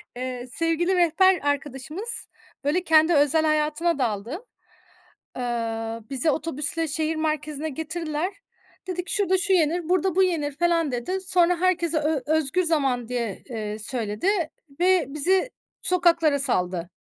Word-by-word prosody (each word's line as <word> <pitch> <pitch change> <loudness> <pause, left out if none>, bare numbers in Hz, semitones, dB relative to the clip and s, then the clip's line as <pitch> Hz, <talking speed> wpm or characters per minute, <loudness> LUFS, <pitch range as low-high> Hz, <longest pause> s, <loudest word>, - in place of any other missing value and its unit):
Eee, 250 0 -5
sevgili 330 +3 +1
rehber 360 +2 +4
arkadaşımız, 290 - -2 0.4
böyle, 305 +6 +1
kendi 320 0 +4
özel 295 +1 +3
hayatına 310 +1 +1
daldı. 240 - -3 0.9
Eee, 230 -2 -3
bizi 270 +3 +1
otobüsle 320 +1 -1
şehir 315 +2 -1
merkezine 305 -1 -2
getirdiler. 320 +3 -3 0.5
Dedi 360 -1 -3
ki: - - -2
"Şurada 380 -2 +2
şu 385 +1 +1
yenir, 335 -1 +1
burada 370 0 +1
bu 380 - +5
yenir." 320 -6 0
felan 335 -3 +1
dedi. 255 +11 -3
Sonra, 355 -2 +2
herkese 345 -3 +1
ö 300 -1 0
özgür 315 +3 +1
zaman, 270 -8 0
diye, 235 -5 -4
eee, 215 -3 -5
söyledi 220 - -1 0.5
ve 365 -1 +3
bizi 365 - +1 0.3
sokaklara 335 -5 +3
saldı. 180 -10 0
310 Hz, 130 wpm, -24 LUFS, 265-345 Hz, 0.9 s, bu